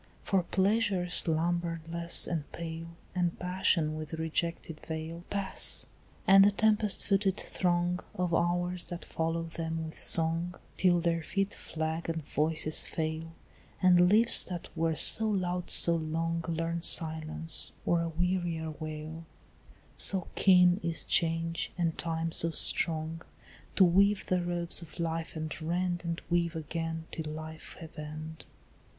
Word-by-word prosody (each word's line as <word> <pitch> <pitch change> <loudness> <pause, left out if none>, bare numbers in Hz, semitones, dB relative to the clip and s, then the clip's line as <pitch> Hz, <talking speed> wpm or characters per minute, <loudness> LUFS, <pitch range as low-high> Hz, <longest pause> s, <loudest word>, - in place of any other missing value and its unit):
For 195 -2 +1
Pleasure 195 0 0
slumberless 170 0 0
and 160 -4 -5
pale, 165 0 -7 0.3
And 175 -2 -2
Passion 180 -4 -1
with 155 +1 -8
rejected 160 0 -3
veil, 160 +1 -7
Pass, 200 -1 +4 0.4
and 195 -1 +7
the 200 - +5
tempest 210 0 +1
footed 195 -1 0
throng 175 0 -1 0.2
Of 180 -1 -2
hours 175 +1 -1
that 175 -1 -8
follow 165 +1 -3
them 165 0 -5
with 160 - -9
song 165 +2 0 0.2
Till 175 -2 +2
their 165 -1 -1
feet 195 +4 -3
flag 160 +1 -5
and 160 -3 -5
voices 155 0 0
fail, 160 0 -5 0.5
And 180 -1 +4
lips 225 +4 +6
that 175 -2 -8
were 165 0 -1
so 220 +7 +4
loud 180 -3 -2
so 170 -1 +6
long 165 +1 -3
Learn 165 0 -3
silence, 160 -1 +5
or 170 -1 +1
a 165 - -3
wearier 170 -1 -2
wail; 155 +1 -7 0.7
So 190 -3 0
keen 180 -1 +4
is 165 -1 -3
change, 165 0 0
and 165 -2 -1
time 165 0 -3
so 165 - +3
strong, 160 0 +3 0.5
To 195 - +5
weave 195 +3 +3
the 180 -1 0
robes 175 0 -2
of 170 +1 -13
life 165 0 -4
and 155 +1 -6
rend 175 +2 -2
And 170 -1 -4
weave 170 -1 -1
again 165 +1 -5
till 155 -2 -6
life 155 0 -9
have 160 -1 -11
end. 155 +1 -9
170 Hz, 140 wpm, -29 LUFS, 160-180 Hz, 0.7 s, and